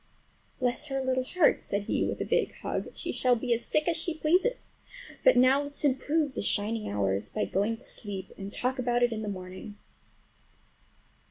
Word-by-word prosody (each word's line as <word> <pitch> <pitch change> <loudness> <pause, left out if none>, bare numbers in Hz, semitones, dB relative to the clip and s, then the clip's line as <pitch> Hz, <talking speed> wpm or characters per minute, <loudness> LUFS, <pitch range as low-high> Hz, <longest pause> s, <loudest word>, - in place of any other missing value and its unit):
"Bless 255 +3 +1
her 270 -1 -2
little 260 -1 0
heart!" 320 +4 +3
said 200 0 -2
he - - 0
with - - -2
a - - -1
big - - 0
hug; - - -2
"she - - -4
shall 250 -1 +3
be 240 +1 0
as 235 0 -1
sick 305 +1 +1
as 340 - +2
she 330 0 -2
pleases! 360 +10 +1 0.5
But - - +6
now 260 +3 +5
let's 285 +1 -4
improve 290 +2 +1
the - - -3
shining 210 +2 0
hours 100 -1 0
by 215 - -1
going 205 +4 0
to 225 - -9
sleep, 195 -3 -5
and 195 0 -7
talk 255 +4 -2
about 245 -1 +1
it 240 - +3
in 215 - -4
the 215 - -4
morning!" 185 +1 -7
245 Hz, 190 wpm, -29 LUFS, 205-285 Hz, 0.5 s, But